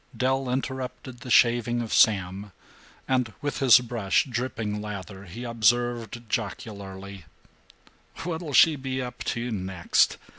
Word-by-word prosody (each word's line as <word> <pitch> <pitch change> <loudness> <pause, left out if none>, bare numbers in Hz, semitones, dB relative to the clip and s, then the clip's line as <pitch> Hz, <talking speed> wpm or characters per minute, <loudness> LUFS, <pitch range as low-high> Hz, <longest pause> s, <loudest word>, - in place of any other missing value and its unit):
Del 130 0 0
interrupted 130 -1 -4
the 125 - -9
shaving 120 0 +4
of 115 -2 -3
Sam 100 -1 +2 0.5
and, 125 -4 0
with 145 -1 -3
his 130 -4 +8
brush 115 -5 0
dripping 115 -5 -3
lather, 100 -1 -7
he 100 +7 -8
observed 120 0 0
jocularly: 100 - -5 1.0
"What'll 165 -3 -4
she 160 +3 +6
be 130 -1 -3
up 125 -1 -5
to 120 +1 -2
next? 95 -4 +1
120 Hz, 120 wpm, -26 LUFS, 100-130 Hz, 1.0 s, his